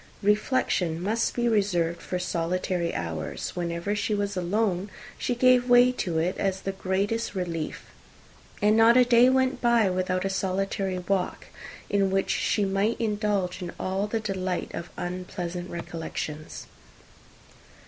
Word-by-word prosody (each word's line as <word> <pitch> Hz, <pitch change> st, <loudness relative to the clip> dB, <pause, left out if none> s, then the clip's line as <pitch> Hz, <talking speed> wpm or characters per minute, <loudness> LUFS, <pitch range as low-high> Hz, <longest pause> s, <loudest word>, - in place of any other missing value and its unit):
Reflection 205 Hz, -5 st, +1 dB
must 215 Hz, +6 st, 0 dB
be 240 Hz, -1 st, +1 dB
reserved 180 Hz, -6 st, +1 dB
for 180 Hz, -, -3 dB
solitary 180 Hz, 0 st, -1 dB
hours: 80 Hz, -3 st, -4 dB
whenever 170 Hz, +3 st, -2 dB
she 210 Hz, +1 st, 0 dB
was 200 Hz, -1 st, -2 dB
alone, 190 Hz, +1 st, 0 dB, 0.3 s
she 245 Hz, -, -2 dB
gave 250 Hz, 0 st, +4 dB
way 245 Hz, +1 st, +7 dB
to 180 Hz, -9 st, -2 dB
it 170 Hz, +3 st, 0 dB
as 190 Hz, -1 st, -1 dB
the 195 Hz, -, -2 dB
greatest 200 Hz, +4 st, -1 dB
relief; 170 Hz, -4 st, -3 dB, 0.8 s
and 210 Hz, +1 st, +5 dB
not 225 Hz, +2 st, +6 dB
a 250 Hz, -, +6 dB
day 240 Hz, +1 st, +6 dB
went 260 Hz, 0 st, +1 dB
by 235 Hz, -5 st, +4 dB
without 185 Hz, 0 st, -1 dB
a -, -, +2 dB
solitary 190 Hz, 0 st, -1 dB
walk, 180 Hz, +1 st, -2 dB, 0.4 s
in 200 Hz, -1 st, +2 dB
which 195 Hz, 0 st, 0 dB
she 205 Hz, -, +1 dB
might 195 Hz, +4 st, 0 dB
indulge 205 Hz, -4 st, -1 dB
in 175 Hz, -1 st, -4 dB
all 190 Hz, +2 st, -1 dB
the 225 Hz, +2 st, -1 dB
delight 190 Hz, -4 st, -3 dB
of 170 Hz, -, -6 dB
unpleasant 180 Hz, 0 st, -5 dB
recollections. 160 Hz, -2 st, -6 dB
195 Hz, 140 wpm, -26 LUFS, 180-215 Hz, 0.8 s, way